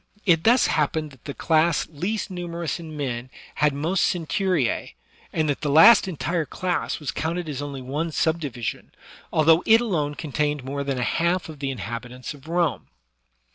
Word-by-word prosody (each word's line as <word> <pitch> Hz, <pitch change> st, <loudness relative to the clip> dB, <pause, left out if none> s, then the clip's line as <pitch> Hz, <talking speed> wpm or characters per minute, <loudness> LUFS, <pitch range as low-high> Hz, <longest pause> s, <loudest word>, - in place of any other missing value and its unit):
It 165 Hz, -4 st, +3 dB
thus 240 Hz, +3 st, +5 dB
hap 150 Hz, -2 st, +1 dB
pened 155 Hz, -2 st, -3 dB
that 130 Hz, -4 st, -19 dB
the 140 Hz, -, -5 dB
class 160 Hz, 0 st, +2 dB
least 190 Hz, +8 st, -3 dB
numerous 170 Hz, -2 st, -4 dB
in 160 Hz, -2 st, -8 dB
men 125 Hz, -3 st, -3 dB, 0.3 s
had 150 Hz, 0 st, +5 dB
most 160 Hz, +6 st, +1 dB
centuries^ 180 Hz, -, -1 dB, 0.4 s
and 155 Hz, -1 st, 0 dB
that 145 Hz, -, -1 dB
the 150 Hz, -, -1 dB
last 165 Hz, +9 st, +8 dB
entire 165 Hz, 0 st, -1 dB
class 180 Hz, -2 st, -2 dB
was 150 Hz, -4 st, -3 dB
counted 165 Hz, +2 st, -3 dB
as 145 Hz, -2 st, -4 dB
only 140 Hz, -2 st, -6 dB
one 150 Hz, +6 st, -2 dB
subdivision, 150 Hz, -8 st, -2 dB, 0.4 s
although 160 Hz, +2 st, +5 dB
it 225 Hz, +1 st, +7 dB
alone 155 Hz, -11 st, -1 dB
contained 150 Hz, -2 st, -2 dB
more 140 Hz, +2 st, -3 dB
than 135 Hz, -2 st, -2 dB
a 125 Hz, -, -1 dB
half 170 Hz, +6 st, 0 dB
of 155 Hz, -3 st, -10 dB
the 140 Hz, -1 st, -2 dB
inhabitants 125 Hz, +2 st, -6 dB
of 145 Hz, +1 st, -15 dB
Rome. 170 Hz, -1 st, 0 dB
155 Hz, 175 wpm, -24 LUFS, 140-170 Hz, 0.4 s, last